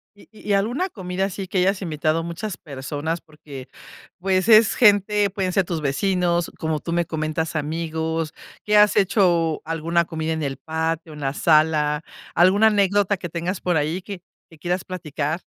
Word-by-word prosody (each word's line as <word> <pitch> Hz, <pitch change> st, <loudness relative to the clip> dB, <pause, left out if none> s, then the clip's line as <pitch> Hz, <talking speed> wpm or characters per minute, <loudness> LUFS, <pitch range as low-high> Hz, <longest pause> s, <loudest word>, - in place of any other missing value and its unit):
Y 205 Hz, -, -19 dB
y 210 Hz, -1 st, -4 dB
alguna 245 Hz, -, 0 dB
comida, 190 Hz, -, -3 dB
así 195 Hz, 0 st, -5 dB
que 185 Hz, -, -2 dB
hayas 190 Hz, +2 st, +1 dB
invitado 155 Hz, -1 st, -1 dB
muchas 170 Hz, +4 st, -5 dB
personas. 145 Hz, +3 st, -5 dB
Porque, 145 Hz, -4 st, -12 dB, 0.5 s
pues, 185 Hz, +2 st, +1 dB
es 220 Hz, 0 st, +6 dB
gente 205 Hz, -2 st, +4 dB
pueden 190 Hz, -1 st, -2 dB
ser 195 Hz, -, +3 dB
tus 165 Hz, -3 st, -3 dB
vecinos, 175 Hz, +4 st, 0 dB
como 160 Hz, -1 st, -1 dB
tú 170 Hz, -, -6 dB
me 170 Hz, -1 st, +1 dB
comentas, 160 Hz, 0 st, -3 dB
amigos. 160 Hz, +1 st, -2 dB, 0.3 s
Que 210 Hz, 0 st, +3 dB
has 210 Hz, 0 st, +5 dB
hecho 175 Hz, -5 st, +2 dB
alguna 165 Hz, +1 st, 0 dB
comida 160 Hz, -1 st, -3 dB
en 160 Hz, -1 st, -3 dB
el 135 Hz, -2 st, -3 dB
patio, 160 Hz, +1 st, -3 dB
en 150 Hz, -, -10 dB
la 135 Hz, 0 st, -1 dB
sala. 155 Hz, -1 st, +2 dB, 0.3 s
Alguna 190 Hz, +6 st, +5 dB
anécdota 200 Hz, -1 st, +2 dB
que 175 Hz, -2 st, -6 dB
tengas 175 Hz, +3 st, -3 dB
por 175 Hz, -3 st, +1 dB
ahí, 155 Hz, +5 st, -1 dB
que 190 Hz, -2 st, -8 dB, 0.3 s
que 160 Hz, -, -15 dB
quieras 175 Hz, +3 st, -2 dB
platicar. 160 Hz, -2 st, -4 dB
170 Hz, 170 wpm, -22 LUFS, 155-195 Hz, 0.5 s, es